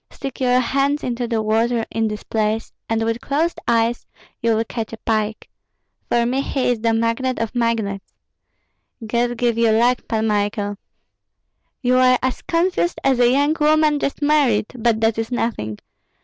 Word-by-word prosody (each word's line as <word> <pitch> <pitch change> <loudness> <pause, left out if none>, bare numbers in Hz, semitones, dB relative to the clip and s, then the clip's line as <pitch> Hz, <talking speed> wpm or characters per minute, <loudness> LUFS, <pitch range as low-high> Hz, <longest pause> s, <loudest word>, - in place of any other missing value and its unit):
Stick 270 -2 -7
your 250 0 +3
hands 275 +4 0
into 240 -1 -2
the 225 -2 -1
water 225 +2 +1
in 225 0 0
this 210 0 -5
place, 220 0 -1 0.2
and 225 0 0
with 230 +1 -2
closed 305 +8 -1
eyes 230 0 +1 0.3
you 230 -1 +2
will 225 - +1
catch 225 -1 -5
a 225 - -7
pike. 215 -1 -2 0.6
For 235 0 +2
me 255 +3 0
he 270 -2 -1
is 240 - -1
the 230 0 +2
magnate 230 +3 0
of 230 0 -3
magnates! 225 -5 -1 0.9
God 240 +2 0
give 235 -1 +1
you 230 -1 +4
luck, 240 +3 +3
Pan 220 -1 0
Michael! 205 -1 -1 1.1
You 250 0 +3
are 255 0 +5
as 260 0 -1
confused 345 +1 0
as 265 -2 +2
a 240 -1 +5
young 285 +4 +2
woman 305 0 +3
just 280 +1 -3
married; 285 -8 +3
but 230 -2 +1
that 225 0 +2
is 225 +2 -3
nothing! 210 - -2
235 Hz, 170 wpm, -20 LUFS, 225-255 Hz, 1.1 s, are